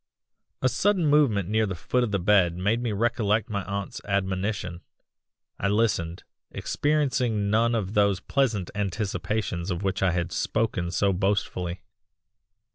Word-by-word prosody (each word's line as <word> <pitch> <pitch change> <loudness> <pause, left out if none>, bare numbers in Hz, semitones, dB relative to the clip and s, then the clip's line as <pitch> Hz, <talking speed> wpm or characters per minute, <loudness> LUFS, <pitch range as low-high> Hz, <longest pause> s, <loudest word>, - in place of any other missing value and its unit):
"A - - +5
sudden 190 +5 +2
movement 140 - +3
near 110 +1 +1
the 95 - -3
foot 125 +9 0
of 120 - 0
the 100 - +1
bed 90 -2 +3
made 105 +6 +1
me 120 -2 -1
recollect 110 0 0
my 100 -2 -1
aunt's 100 +7 -4
admonition. 95 -2 -2 0.8
I 100 - 0
listened, 100 -5 0 0.3
experiencing 125 -8 0
none 115 +2 +3
of 100 -3 -2
those 100 -3 +3
pleasant 110 -5 0
anticipations 100 -2 -2
of 90 +1 -2
which 95 +1 -1
I 95 - +4
had 90 0 -1
spoken 110 -6 -1
so 95 +3 +1
boastfully. 90 -2 -1
100 Hz, 140 wpm, -26 LUFS, 95-115 Hz, 0.8 s, A